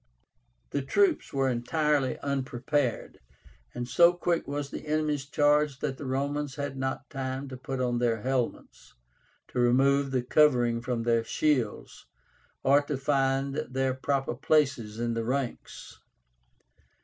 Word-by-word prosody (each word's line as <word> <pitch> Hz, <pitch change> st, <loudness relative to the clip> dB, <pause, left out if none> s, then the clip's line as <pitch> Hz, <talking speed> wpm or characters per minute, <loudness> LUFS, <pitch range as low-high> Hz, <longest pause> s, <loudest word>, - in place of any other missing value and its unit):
The 140 Hz, -, -1 dB
troops 365 Hz, -, +1 dB
were 135 Hz, -1 st, +1 dB
entirely 135 Hz, +3 st, 0 dB
unprepared, 135 Hz, -1 st, -2 dB, 0.6 s
and 120 Hz, -, -4 dB
so 170 Hz, +6 st, +5 dB
quick 175 Hz, -3 st, -1 dB
was 145 Hz, 0 st, -4 dB
the -, -, -7 dB
enemy's 150 Hz, -2 st, -1 dB
charge 145 Hz, -1 st, +2 dB
that 135 Hz, -1 st, -3 dB
the 140 Hz, -, -6 dB
Romans 140 Hz, +2 st, -2 dB
had 145 Hz, -2 st, -4 dB
not 130 Hz, +1 st, -3 dB
time 135 Hz, -1 st, -4 dB
to 130 Hz, -, -7 dB
put 130 Hz, +1 st, -5 dB
on 120 Hz, -1 st, 0 dB
their 115 Hz, -3 st, 0 dB
helmets, 130 Hz, -2 st, -3 dB, 0.5 s
to -, -, -3 dB
remove 135 Hz, +3 st, +3 dB
the 130 Hz, -2 st, 0 dB
covering 125 Hz, -4 st, +3 dB
from 120 Hz, -1 st, -2 dB
their 115 Hz, -1 st, +2 dB
shields, 130 Hz, -5 st, -1 dB, 0.6 s
or 140 Hz, +2 st, +5 dB
to 145 Hz, -1 st, -3 dB
find 135 Hz, 0 st, +1 dB, 0.2 s
their 130 Hz, 0 st, 0 dB
proper 135 Hz, 0 st, -1 dB
places 130 Hz, -5 st, +1 dB
in 120 Hz, 0 st, -1 dB
the 115 Hz, 0 st, -2 dB
ranks. 130 Hz, +1 st, -4 dB
135 Hz, 135 wpm, -28 LUFS, 125-145 Hz, 0.6 s, so